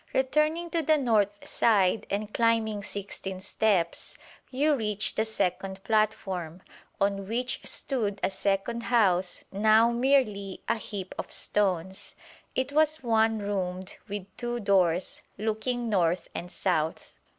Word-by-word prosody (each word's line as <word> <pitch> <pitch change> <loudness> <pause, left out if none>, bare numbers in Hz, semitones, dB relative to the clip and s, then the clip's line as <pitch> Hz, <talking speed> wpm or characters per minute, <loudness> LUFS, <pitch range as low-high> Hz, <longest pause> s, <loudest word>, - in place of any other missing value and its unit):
Returning 305 +6 +1
to 335 - +1
the 310 0 +3
north 210 -6 +1
side 205 -2 +2
and 210 +1 -3
climbing 225 -2 +2
sixteen 195 -2 -5
steps, 190 -3 0 0.3
you 290 +4 +2
reach 215 -5 0
the 220 - 0
second 195 -2 -2
platform, 190 -6 -1 0.4
on 195 -1 0
which 250 +4 -2
stood 215 -7 -1
a - - +2
second 200 +4 -1
house 190 -7 +2
now 220 +3 +4
merely 235 -6 +1
a - - +1
heap 200 -3 -6
of - - -5
stones. 190 -2 0 0.4
It 260 +2 -1
was 310 +1 +3
one 225 -1 +3
roomed 190 -3 -3
with 205 -2 -5
two 240 0 -3
doors, 185 -4 +1 0.2
looking 225 +3 -2
north 180 -4 +1
and 175 +1 -6
south. 160 -6 -1
210 Hz, 130 wpm, -28 LUFS, 190-235 Hz, 0.4 s, now